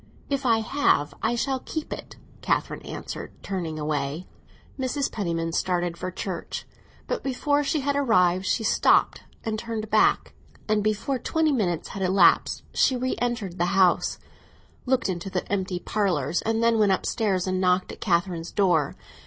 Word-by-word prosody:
"If 275 -1 0
I 225 -1 +4
have, 220 - +1
I 225 +2 +1
shall 265 +2 0
keep 315 +4 -5
it!" - - -9 0.3
Catherine - - -1
answered, - - -7
turning 175 -5 -3
away. 150 +2 -2 0.5
Mrs. 265 +2 -1
Penniman 165 -5 -2
started 175 -1 0
for 185 +2 -4
church; 185 -1 -5 0.4
but - - -2
before 285 +2 0
she 290 +1 0
had 285 +1 0
arrived, 185 -9 +3
she 225 - +1
stopped - - +3 0.2
and 220 -1 -1
turned 225 -2 -5
back, 215 - +3 0.3
and 215 -1 +2
before 215 +5 0
twenty 320 +4 +1
minutes 185 - -1
had 195 - -6
elapsed 185 -1 +4
she 265 - +3
re 255 +1 -1
entered 235 -7 -2
the 175 +3 +1
house, 185 -2 +3 0.7
looked 260 0 +2
into 185 0 -3
the 185 -1 -3
empty 190 -2 -1
parlours, 195 -4 0
and 225 +1 0
then 230 -1 +3
went 205 -2 +4
upstairs 190 -2 0
and 185 0 -1
knocked 180 0 +2
at - - -11
Catherine's 170 -2 0
door. 175 -8 +2
200 Hz, 160 wpm, -25 LUFS, 180-240 Hz, 0.7 s, I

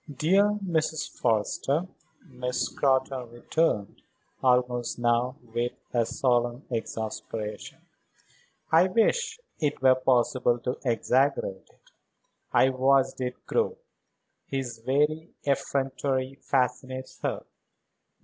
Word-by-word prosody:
"Dear 195 +9 +3
Mrs. 155 -3 0
Forrester," 130 - 0 0.4
Miss 125 -2 -2
Scrotton 130 -2 0
returned, 120 - -1 0.4
almost 125 -1 +2
now 120 +1 +1 0.2
with 120 +1 -1 0.2
a 120 -2 +2
solemn 120 +1 0
exasperation, 110 -2 -4 0.9
"I 165 +3 +6
wish 440 - +1 0.2
it 150 -2 0
were 130 -1 +6
possible 125 -1 +2
to 125 +1 -3
exaggerate 125 -4 +1
it. - - -28 0.6
I 130 - +5
watched 130 0 +2
it 125 0 -4
grow. 465 0 0 0.7
His 130 -4 -4
very 150 +6 0
effrontery 135 -1 -1
fascinates 130 0 -1
her. - - -2
130 Hz, 95 wpm, -27 LUFS, 120-145 Hz, 0.9 s, I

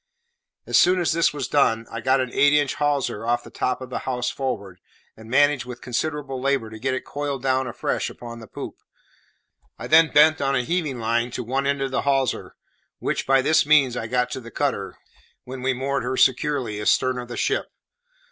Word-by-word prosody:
As - - +3
soon 180 +1 +4
as 175 - +1
this 165 +1 +2
was 140 -3 -4
done, 115 -6 +2
I 115 - -5
got 130 +2 +2
an 130 -1 -3
eight 145 0 +4
inch 145 -2 +2
hawser 145 -7 -1
off 120 +1 0
the - - -13
top 130 - -2
of 130 0 -8
the - - -2
house 125 -1 -2
forward, 100 -9 -4 0.4
and 110 0 -13
managed 145 0 +3
with 125 -1 -8
considerable 135 +1 -3
labour 135 -5 0
to 110 - -9
get 130 +3 -1
it - - -5
coiled 140 -2 -4
down 130 -1 +1
afresh 120 - -2
upon 120 -1 -9
the 115 - -11
poop. - - -8 1.0
I - - -7
then 160 0 +5
bent 155 +1 +5
on 135 0 +1
a 125 - +1
heaving 155 -3 -1
line 120 +1 0
to - - -3
one 135 +4 -1
end 140 -1 0
of 135 - -3
the 130 - 0
hawser, 135 -2 0 0.4
which, - - -2
by 135 0 +4
this 155 +2 +4
means, 140 -5 +4
I 115 - -3
got 125 +1 0
to 130 - -4
the 115 - -10
cutter, - - -2 0.5
when 130 0 -8
we 130 +1 +1
moored 135 +2 -1
her 130 +1 -3
securely 130 -5 +1
astern 125 +4 +2
of 120 - -7
the 120 - -7
ship. - - 0
130 Hz, 210 wpm, -23 LUFS, 120-140 Hz, 1.0 s, then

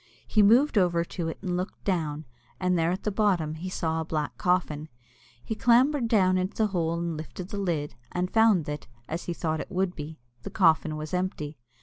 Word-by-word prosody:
He 215 - +3
moved 235 +4 +5
over 170 -2 +2
to 170 -1 -4
it, 165 - -4
and 180 -2 -1
looked 180 +2 -4
down, 155 -5 -1 0.3
and 180 -1 +1
there 165 -1 +2
at 185 +3 -2
the 210 - 0
bottom 190 -7 +1
he 170 +4 -5
saw 160 -3 -1
a - - -1
black 155 -2 -3
coffin. 160 -4 0 0.5
He - - -3
clambered 245 +4 +3
down 185 -5 +3
into 185 +2 -3
the - - +3
hole 170 -2 0
and 170 -1 -2
lifted 160 +4 -7
the 205 - -4
lid, 165 -7 -1 0.2
and 180 +1 -2
found 220 -7 +5
that 150 0 -5 0.2
(as 165 +2 -4
he 175 - -2
thought 160 -2 -1
it - - -8
would 185 -1 -1
be) 155 +1 -7 0.2
the - - -6
coffin 160 -4 +3
was 155 +1 -6
empty. 160 -6 -3
180 Hz, 210 wpm, -27 LUFS, 160-195 Hz, 0.5 s, moved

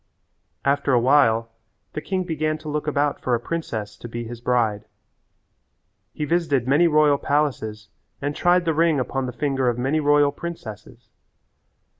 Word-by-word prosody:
After 140 0 +2
a 125 - +5
while 115 -3 +3 0.4
the 155 - -4
king 185 +3 -2
began 155 -2 -1
to 155 0 -12
look 150 0 -3
about 145 -1 0
for 125 - +1
a - - -2
princess 115 -8 -4
to - - -9
be 120 +1 -5
his 120 0 -8
bride. 115 -4 0 1.3
He 150 - -2
visited 145 -6 0
many 150 +6 +4
royal 150 -2 +4
palaces 125 -7 -1 0.3
and 145 +1 -3
tried 175 0 +3
the 165 - +1
ring 160 -2 +2
upon 130 +1 -2
the - - -4
finger 135 -1 0
of 120 - -2
many 135 +5 0
royal 145 -1 +4
princesses. 155 -11 -9
140 Hz, 160 wpm, -23 LUFS, 120-155 Hz, 1.3 s, a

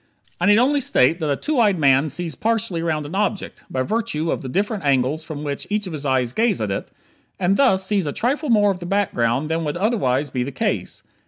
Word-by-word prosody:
I - - +1
need 205 +1 +6
only 280 +4 +3
state 165 - +2
that 155 -3 -2
a 140 - +2
two 300 - -1
eyed 205 -5 +3
man 140 0 +3
sees 165 +2 -3
partially 220 - -1
around 155 -3 -1
an 145 - -8
object 205 0 -2
(by 130 - -1
virtue 170 - -1
of - - -2
the 130 - -6
different 205 - -1
angles 140 +2 +1
from 150 -2 -7
which 140 -2 -4
each 210 0 -1
of 180 - -6
his 145 -2 -4
eyes 130 -2 +1
gaze 225 - +1
at 105 -2 -2
it) 95 - -4 0.5
and 190 +1 +2
thus 195 -7 +3
sees 195 -4 0
a - - -1
trifle 275 - -1
more 205 -3 +4
of 185 - -5
the 175 - -7
background 145 - 0
than 165 +1 -1
would 150 +1 -2
otherwise 150 - 0
be 125 - -2
the 130 +3 -3
case. - - -3
170 Hz, 235 wpm, -21 LUFS, 140-210 Hz, 0.5 s, need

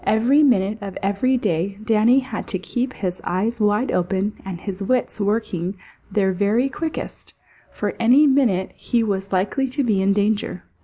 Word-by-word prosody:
Every 240 +7 +3
minute 215 -6 +2
of 195 -2 -6
every 205 +7 +1
day 195 -2 -1
Danny 225 +4 +4
had 255 -5 -6
to 190 - -2
keep 245 +7 -3
his 185 -2 -4
eyes 215 +6 -1
wide 210 +4 +2
open 190 +3 0
and 190 -3 -6
his 195 +1 -6
wits 245 +1 0
working 200 -3 -1 0.4
their 195 -1 +2
very 205 +8 +1
quickest, 320 +3 -5 0.4
for - - -3
any 255 +6 +5
minute 250 -10 +2
he 235 -1 -1
was 195 -2 -2
likely 200 +9 0
to 270 +2 -1
be 210 -6 +1
in 195 +1 +2
danger. 205 -2 0
210 Hz, 165 wpm, -21 LUFS, 195-245 Hz, 0.4 s, any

